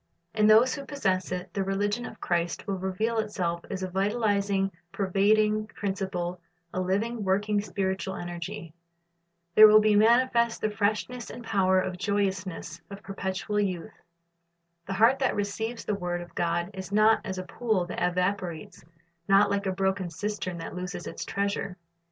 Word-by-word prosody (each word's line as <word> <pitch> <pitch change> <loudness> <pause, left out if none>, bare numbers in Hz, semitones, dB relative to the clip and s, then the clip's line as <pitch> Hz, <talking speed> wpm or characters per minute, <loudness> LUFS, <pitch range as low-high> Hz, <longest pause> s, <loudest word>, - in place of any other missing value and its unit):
In 215 -1 +3
those 225 +4 +6
who 280 - -5
possess 190 -12 -1
it, 180 0 -4
the 195 - 0
religion 205 +4 -1
of 220 - -11
Christ 175 -1 -1
will 195 -3 -2
reveal 215 +5 -1
itself 180 -5 -2
as 190 - -4
a - - -1
vitalizing, 200 0 +1 0.2
pervading 210 +2 +2
principle, 190 -4 -3 0.3
a 185 - -1
living, 210 +5 -1
working, 205 +2 +1
spiritual 190 -1 -2
energy. 175 0 -6 0.8
There 215 +3 +10
will 215 0 +8
be 215 -1 +3
manifest 235 +1 +4
the 215 - -1
freshness 215 +4 -1
and 245 - -8
power 190 -4 +3
and 180 -1 -4
joyousness 190 -5 -2
of 200 +1 -9
perpetual 195 0 -3
youth. 185 -5 -2 0.9
The 195 - -2
heart 230 +7 +4
that 265 - +1
receives 220 +3 -3
the 210 - 0
word 175 -3 -2
of 175 - -11
God 170 +2 -1
is 190 0 -7
not 215 +2 +4
as 190 -3 -4
a 185 - -3
pool 215 -2 -1
that 175 - -5
evaporates, 180 -2 -2 0.4
not 200 +1 +5
like 200 0 0
a - - +1
broken 190 -1 -1
cistern 200 -1 -4
that 165 - -6
loses 180 0 -5
its - - -5
treasure. 200 -2 -2
195 Hz, 160 wpm, -27 LUFS, 185-215 Hz, 0.9 s, There